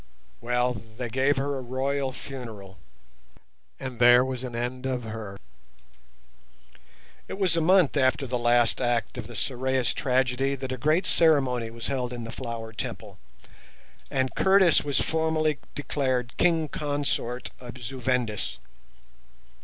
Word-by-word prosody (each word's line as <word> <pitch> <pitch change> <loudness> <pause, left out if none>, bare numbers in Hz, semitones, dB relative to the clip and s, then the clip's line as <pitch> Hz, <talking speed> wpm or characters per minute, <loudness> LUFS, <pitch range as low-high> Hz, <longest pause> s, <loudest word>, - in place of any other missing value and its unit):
Well, 125 -1 0 0.2
they 125 -2 -3
gave 135 +4 +2
her 140 +1 -1
a 135 - -4
royal 135 +2 -1
funeral, 110 -8 -9 1.0
and 130 -3 -6
there 120 +1 +7
was 130 -1 -4
an 125 -2 -5
end 125 +2 -3
of 125 -2 -2
her. 110 -3 -6 1.9
It - - -6
was 185 -4 +2
a 165 - +2
month 180 -2 +4
after 135 +1 +2
the 125 -1 -2
last 120 -1 +3
act 120 -1 0
of 110 - -6
the 120 - -10
Sorais 130 +2 0
tragedy 130 +1 +1
that 130 -1 -5
a 130 - -2
great 155 +8 +2
ceremony 135 -8 +3
was 115 0 -7
held 125 -3 -1
in 120 -1 -5
the 115 - -6
Flower 115 -1 -6
Temple, - - -6 0.9
and 130 -1 0
Curtis 190 -3 +5
was 145 -2 0
formally 160 -2 +1 0.2
declared 130 -4 -1
King 165 -3 +3
Consort 145 -4 -2
of 125 0 -9
Zu 130 +2 -7
Vendis. 125 -4 -1
130 Hz, 140 wpm, -26 LUFS, 120-140 Hz, 1.9 s, there